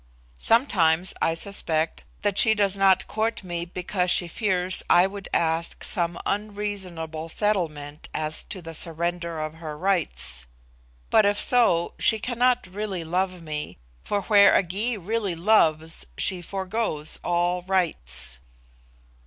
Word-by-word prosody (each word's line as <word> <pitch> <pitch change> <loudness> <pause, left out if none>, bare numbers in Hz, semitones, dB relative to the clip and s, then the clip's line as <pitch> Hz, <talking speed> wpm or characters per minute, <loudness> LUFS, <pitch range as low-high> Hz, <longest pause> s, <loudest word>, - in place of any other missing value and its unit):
Sometimes 185 - +3
I 165 - +2
suspect 165 -4 0 0.2
that 205 -2 +1
she 220 -1 +7
does 200 -2 +2
not 195 -1 +4
court 220 0 -2
me 175 -2 -4
because 180 +1 -2
she 175 0 +3
fears 185 0 0
I 175 +1 +6
would 195 0 -6
ask 165 0 0
some 170 -1 -1
unreasonable 190 -6 -4
settlement 160 -8 -2
as 155 0 -2
to 185 -3 -5
the 165 0 -8
surrender 170 +1 -2
of 155 0 -4
her 160 -2 -8
rights. 155 - -1 0.6
But 215 - +5
if 205 0 +1
so, 230 -9 +3
she 220 - +4
cannot 250 +1 +1
really 190 -1 -4
love 180 +1 -2
me, 150 - -5 0.3
for 205 -1 -1
where 205 0 +6
a - - +4
Gy 210 +7 -2
really 200 -1 -2
loves 165 - +2
she 185 -2 0
forgoes 190 -4 -2
all 175 +1 0
rights." 115 - -2
180 Hz, 135 wpm, -25 LUFS, 165-205 Hz, 0.6 s, she